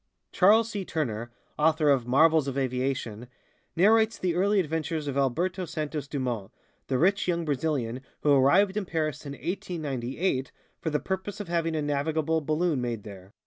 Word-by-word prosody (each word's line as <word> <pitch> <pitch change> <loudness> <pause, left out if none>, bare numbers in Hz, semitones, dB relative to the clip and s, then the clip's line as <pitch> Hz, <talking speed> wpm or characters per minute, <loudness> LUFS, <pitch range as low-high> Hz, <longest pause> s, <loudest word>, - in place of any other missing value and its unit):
Charles 215 +4 +5
C. 200 -2 -3
Turner, 120 -10 -3 0.3
author 155 -1 +4
of 130 -4 +1
"Marvels 155 +3 +4
of 135 0 -3
Aviation," 125 -3 -2 0.5
narrates 220 +5 +4
the 180 -2 0
early 200 +4 +2
adventures 160 -2 -2
of 140 - -3
Alberto 170 +8 0
Santos 150 -2 -4
Dumont, 125 -8 -3 0.4
the 130 - 0
rich 195 +7 +2
young 170 -2 0
Brazilian 135 -4 -1 0.2
who 145 - +4
arrived 180 +9 +4
in 210 -2 -1
Paris 155 -3 -2
in 140 - -5
1898 145 -4 -3 0.3
for 160 - -2
the 150 -1 0
purpose 190 +4 -4
of 205 -4 -6
having 165 -1 0
a 155 - -1
navigable 155 +2 0
balloon 155 -1 0
made 120 -4 -3
there. 95 -2 -11
155 Hz, 160 wpm, -27 LUFS, 135-175 Hz, 0.5 s, Charles